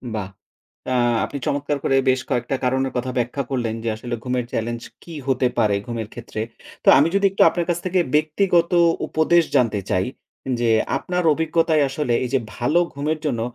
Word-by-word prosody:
বাহ! 100 -3 -4 0.6
অ্যা 130 -1 +1 0.3
আপনি 140 - -6
চমৎকার 145 +1 -1
করে 135 - +2
বেশ 130 0 +3
কয়েকটা 125 +2 -1
কারণের 130 +1 0
কথা 130 +1 -2
ব্যাখ্যা 125 +3 -1
করলেন। 120 -4 -1
যে, 115 - -1
আসলে 120 +2 -5
ঘুমের 125 -1 -1
চ্যালেঞ্জ 120 +1 -3 0.2
কি 170 - -10
হতে 130 -1 +2
পারে, 105 -3 +3
ঘুমের 115 -3 -4
ক্ষেত্রে। 115 -2 -6 0.4
তো, - - -11
আমি 145 +4 +5
যদি 200 0 +3
একটু 195 - -1
আপনার 175 -1 -2
কাছ 170 - +1
থেকে 185 0 +1 0.2
ব্যক্তিগত 170 +3 +2 0.4
উপদেশ 165 +2 +3
জানতে 115 -4 +2
চাই, 90 +1 +1 0.5
যে, 120 -1 +1 0.3
আপনার 180 -1 -2
অভিজ্ঞতায় 160 -1 +2
আসলে 135 -2 -1
এই - - -4
যে 135 - +4 0.2
ভালো 135 +8 +2
ঘুমের 150 +3 -2
জন্য, 120 -6 -1
135 Hz, 175 wpm, -22 LUFS, 120-155 Hz, 0.6 s, আমি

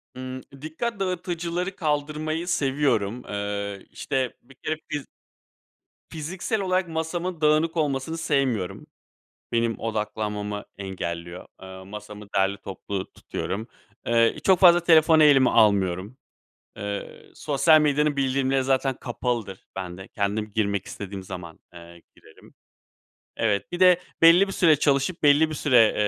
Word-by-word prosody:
Imm. 130 0 -6 0.2
Dikkat 200 +8 -4
dağıtıcıları 180 0 -3
kaldırmayı 155 +1 -2
seviyorum, 130 - 0
eee, 100 -1 -4
işte, 130 -3 -2
bir 135 +1 -19
kere 155 +3 -3
fiz 145 -2 -3 1.0
fiziksel 180 +7 -3
olarak 185 -1 0
masamın 165 +1 -3
dağınık 155 +2 +2
olmasını 150 +1 -1
sevmiyorum. 130 - -1 0.7
Benim 115 -1 0
odaklanmamı 105 -2 -3
engelliyor. 85 -2 -5 0.2
Eee, 95 0 -10
masamı 105 +1 -9
derli 95 +1 +2
toplu 95 0 -6
tutuyorum. 110 +5 -5 0.4
Eee, 115 -1 +3
çok 190 -3 +5
fazla 175 -1 +7
telefonu 160 -1 +5
elime 135 -4 +6
almıyorum. 100 0 +2 0.6
Eee, 100 -1 -6
sosyal 155 +2 +4
medyanın 150 0 +2
bildirimleri 135 0 +1
zaten 135 0 +1
kapalıdır 120 -6 -4
bende. 95 0 -7
Kendim 105 +1 -2
girmek 100 -3 0
istediğim 100 -1 -7
zaman, 85 -3 -9
eee, 85 0 -13
girerim. - - -19 0.8
Evet. 105 - 0
Bir 175 - -4
de 180 -1 +6 0.2
belli 170 +4 +7
bir - - -4
süre 165 -5 +4
çalışıp 140 +4 +1
belli 150 +2 +5
bir 155 - -4
süre, 125 -7 +4
130 Hz, 120 wpm, -25 LUFS, 100-160 Hz, 1.0 s, fazla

